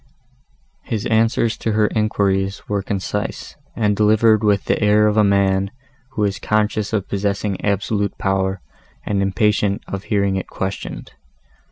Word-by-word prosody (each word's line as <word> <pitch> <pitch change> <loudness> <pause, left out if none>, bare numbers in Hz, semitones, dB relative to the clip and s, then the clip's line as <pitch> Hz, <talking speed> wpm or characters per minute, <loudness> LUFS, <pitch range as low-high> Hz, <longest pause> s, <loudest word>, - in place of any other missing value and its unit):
His 110 -4 -4
answers 115 0 +2
to 110 - -2
her 105 0 +3
enquiries 100 -3 0
were 100 -1 -1
concise, 95 -1 -4 0.2
and 105 -2 +1
delivered 110 +1 +4
with 100 -2 +2
the - - 0
air 105 0 +4
of 105 0 +2
a 110 - +5
man, 100 -1 +2 0.4
who 105 - -1
is 100 -2 -1
conscious 110 -1 0
of 105 -4 -1
possessing 100 0 -2
absolute 100 0 -1
power 95 -1 -1 0.4
and 100 -1 0
impatient 100 +1 +1
of 100 0 -5
hearing 100 -2 +1
it 95 - -4
questioned. 95 +1 -5
100 Hz, 145 wpm, -20 LUFS, 100-105 Hz, 0.4 s, a